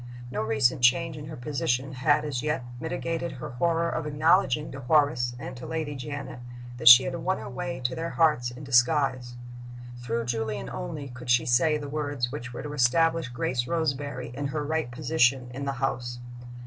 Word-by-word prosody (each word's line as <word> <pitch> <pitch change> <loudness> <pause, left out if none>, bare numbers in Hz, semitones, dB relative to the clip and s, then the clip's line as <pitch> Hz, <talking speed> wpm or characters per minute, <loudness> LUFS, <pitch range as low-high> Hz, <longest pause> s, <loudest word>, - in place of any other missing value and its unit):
No - - -2
recent 120 +3 +1
change 160 +6 +3
in 150 0 -8
her 155 - -7
position 130 0 -2
had, 145 +3 +2
as 135 -5 -2
yet, 150 -3 -1 0.2
mitigated 165 +3 -3
her 130 - -7
horror 165 +6 +1
of 160 -2 -3
acknowledging 150 -1 +2
to 135 - -7
Horace 125 -3 +2
and 130 +1 -7
to 125 - -8
Lady 160 -2 -3
Janet 140 -1 -6 0.4
that 120 -1 -2
she 125 +1 +11
had 135 - -3
won 190 0 -1
her - - -7
way 130 +1 -5
to 125 +1 0
their 165 +4 -3
hearts 150 -8 +2
in 125 +4 -10
disguise. 130 -1 +2 0.6
Through 115 -1 -2
Julian 110 -3 -3
only 100 - -5
could 125 0 -10
she 120 -1 +4
say 130 +6 +3
the 145 -1 -6
words 145 -4 -2
which 130 -3 -6
were 120 - -7
to 150 0 -6
establish 160 +3 +2
Grace 120 0 -2
Roseberry 145 -6 -2
in 140 +2 -3
her 150 +2 -3
right 160 -3 -1
position 125 -1 +1
in 140 +2 -5
the 140 - -1
house. 125 -2 -2
135 Hz, 185 wpm, -27 LUFS, 125-150 Hz, 0.6 s, she